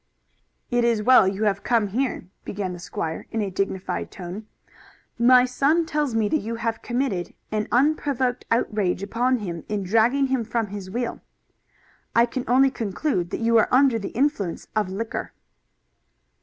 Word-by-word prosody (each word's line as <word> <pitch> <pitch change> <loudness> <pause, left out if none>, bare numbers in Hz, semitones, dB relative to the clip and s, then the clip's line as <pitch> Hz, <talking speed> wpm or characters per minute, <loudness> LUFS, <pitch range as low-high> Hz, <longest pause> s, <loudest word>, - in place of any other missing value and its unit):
"It 245 0 +2
is 230 -3 +2
well 250 -4 +6
you 195 +2 -1
have 200 -2 +1
come 230 -4 +1
here," 245 -1 -2 0.2
began 195 -2 -4
the 175 - -8
squire 165 -2 -5
in 225 - -3
a 195 - -3
dignified 190 0 -2
tone. 190 +4 -8 0.7
"My 250 +1 +6
son 280 +6 +2
tells 295 -6 -1
me 220 -2 +2
that 310 - +2
you 230 +2 -4
have 230 0 -3
committed 240 -8 -2 0.2
an 215 -1 -1
unprovoked 265 -2 +1
outrage 210 -5 0
upon 245 +5 +1
him 175 -7 -5
in 210 -2 -1
dragging 230 +8 +3
him 260 -3 0
from 225 -1 -2
his 200 -2 -7
wheel. 240 +4 -3 0.9
I 235 +1 +6
can 245 +1 -4
only 265 +3 +4
conclude 210 - -2
that - - -4
you 230 0 +4
are - - +3
under 255 -3 +4
the 200 - -5
influence 245 - 0
of 210 -3 +1
liquor." 220 +4 -4
230 Hz, 165 wpm, -24 LUFS, 200-255 Hz, 0.9 s, well